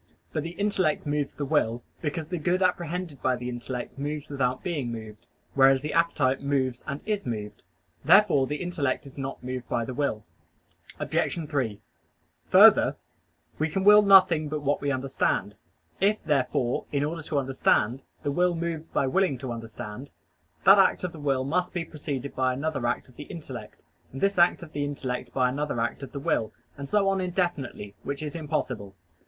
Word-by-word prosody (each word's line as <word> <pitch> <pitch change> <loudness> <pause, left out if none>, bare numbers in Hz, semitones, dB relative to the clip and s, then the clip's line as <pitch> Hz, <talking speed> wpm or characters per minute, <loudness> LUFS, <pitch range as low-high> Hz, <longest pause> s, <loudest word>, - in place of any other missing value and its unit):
But 155 - 0
the 165 +3 -6
intellect 195 -8 +1
moves 145 -1 -1
the 145 - -3
will, 120 -2 +1 0.2
because 155 0 -3
the 180 -2 -2
good 180 +4 +1
apprehended 175 -4 -1
by 130 -1 +2
the 125 0 -5
intellect 125 +2 -5
moves 145 +1 -4
without 130 -2 -1
being 145 -9 -2
moved; 110 -1 -9 0.3
whereas 135 -1 +5
the 150 +1 -4
appetite 145 -5 +2
moves 130 -3 -1
and 140 +1 -4
is 210 -2 -1
moved. 105 -3 -5 0.4
Therefore 175 -11 +5
the 150 - -2
intellect 160 -8 -1
is 135 - -12
not 135 -2 -5
moved 125 -1 -5
by 115 - 0
the 130 - -5
will. 125 -6 -2 0.7
Obj. 165 -3 -1
3: 130 -9 -2 0.7
Further, - - +7 0.6
we 155 +1 +1
can 190 +5 -1
will 210 +1 +8
nothing 185 -6 +6
but 150 0 -3
what 145 +1 +1
we 145 - 0
understand. 130 -7 0 0.5
If, 205 +3 +3
therefore, 130 -3 0
in 145 -1 +1
order 160 +3 -3
to 150 -1 -3
understand, 130 -3 +1 0.2
the 145 - 0
will 175 +4 +2
moves 165 -1 -3
by - - 0
willing 145 0 +1
to 125 0 -5
understand, 115 +2 -7 0.5
that 195 +1 +8
act 195 - +4
of 180 - -2
the 160 - -11
will 135 -3 0
must 180 +7 -1
be 170 -1 -1
preceded 140 -3 -5
by 130 -1 +1
another 135 -2 -2
act 120 - -2
of 125 - -21
the 145 - -7
intellect, 165 -3 -9 0.3
and 135 - -7
this 200 +1 +1
act 175 0 +4
of 160 - -11
the 145 - -1
intellect 135 -3 -4
by 130 -1 +2
another 145 0 -2
act 115 +4 -2
of 135 - -8
the 140 - -5
will, 125 -8 0 0.2
and 140 0 -7
so 205 -2 +3
on 195 -1 +1
indefinitely, 175 - -2
which 140 +2 -4
is 150 0 -5
impossible. 130 -11 -3
145 Hz, 185 wpm, -27 LUFS, 130-170 Hz, 0.7 s, will